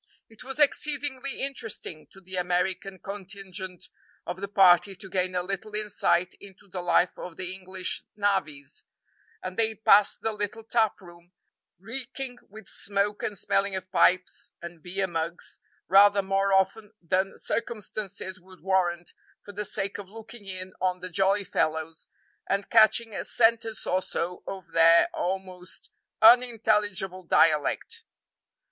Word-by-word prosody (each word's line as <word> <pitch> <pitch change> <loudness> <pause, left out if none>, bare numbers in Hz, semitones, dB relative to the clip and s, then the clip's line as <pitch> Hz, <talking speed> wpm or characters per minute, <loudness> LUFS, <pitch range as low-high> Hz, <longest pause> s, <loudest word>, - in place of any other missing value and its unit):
It 225 - -14
was 270 +3 -5
exceedingly 285 -2 0
interesting 225 - -5
to 195 - -15
the 190 0 -9
American 180 +1 -1
contingent 190 -2 -8 0.4
of 185 - -5
the 200 - -2
party 195 -1 +5
to 190 - -10
gain 185 -1 0
a 180 - 0
little 195 +3 -5
insight 205 -4 +1
into 200 0 -15
the 185 -1 -5
life 175 0 +2
of 180 -2 -8
the 185 0 -5
English 185 0 -5
"navvies;" 190 -9 -1 0.6
and 185 0 -6
they 225 -1 +2
passed 210 -1 +4
the 225 - 0
little 210 +1 -4
tap 225 -2 +1
room, 175 0 -16 0.4
reeking 245 +5 -5
with 215 0 -12
smoke 200 +1 -2
and 205 - -3
smelling 195 +1 0
of 185 0 -6
pipes 185 -1 +2
and 170 -1 -9
beer 190 +3 -2
mugs, 170 -1 -4 0.3
rather 200 +1 +6
more 195 +1 +1
often 195 +3 +1
than 185 +3 -1
circumstances 205 -4 -4
would 185 0 -17
warrant, 175 -2 0 0.3
for 205 - -9
the 210 +1 -4
sake 195 +1 -2
of 195 -2 -9
looking 220 0 -12
in 185 -1 -6
on 185 -1 0
the 185 - -6
jolly 195 +3 +2
fellows, 160 -2 -1 0.4
and 200 +1 -1
catching 225 0 +5
a - - -3
sentence 225 -1 +2
or 185 +1 +1
so 180 0 -3
of 190 -4 -7
their 165 0 +6
almost 185 0 -5 0.3
unintelligible 215 -5 +4
dialect. 155 -4 +2
195 Hz, 140 wpm, -27 LUFS, 180-210 Hz, 0.6 s, rather